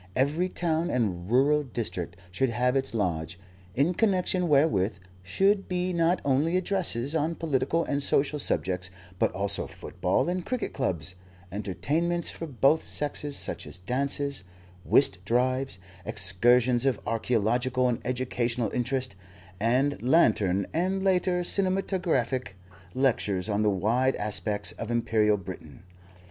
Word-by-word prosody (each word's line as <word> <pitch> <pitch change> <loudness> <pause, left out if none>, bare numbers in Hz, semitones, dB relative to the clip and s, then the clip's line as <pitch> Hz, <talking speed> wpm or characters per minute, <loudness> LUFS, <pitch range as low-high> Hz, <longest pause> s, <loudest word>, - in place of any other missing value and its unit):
Every 150 +8 +1
town 170 -1 -1
and 95 - -1
rural 140 +5 +3
district 110 - -5 0.2
should 130 +8 0
have 125 +2 +1
its 135 -3 0
lodge, 85 -4 -2 0.4
in 145 +7 +2
connection 185 -3 +1
wherewith 130 - +2 0.2
should 195 - +1
be 180 0 -1
not 170 +1 +2
only 145 +6 +2
addresses 170 -9 0
on 160 +1 0
political 165 +1 0
and 140 -2 -2
social 145 +1 +2
subjects, 90 -8 -1 0.3
but - - +2
also 100 +1 -2
football - - -2
and 180 0 -2
cricket 250 +4 -3
clubs, 95 - -2 0.4
entertainments 140 - -1
for 165 - -7
both 140 +3 +2
sexes 145 -1 -2
such - - -3
as - - -5
dances, 140 +5 -2 0.4
whist 100 -6 +3
drives, 130 +3 0 0.3
excursions 120 +8 +3
of 130 - +1
archaeological 120 +3 0
and 120 -2 0
educational 125 -1 -1
interest, 125 -2 -2 0.4
and 130 +6 +1
lantern 105 - +3
(and, 190 +3 0
later, 180 -1 +2
cinematographic) 175 - 0 0.4
lectures 115 -8 +1
on 105 0 0
the 105 - +3
wide 115 +7 +1
aspects 105 0 0
of 115 - -7
Imperial 110 -3 +2
Britain. 95 -2 -10
130 Hz, 130 wpm, -27 LUFS, 105-160 Hz, 0.4 s, rural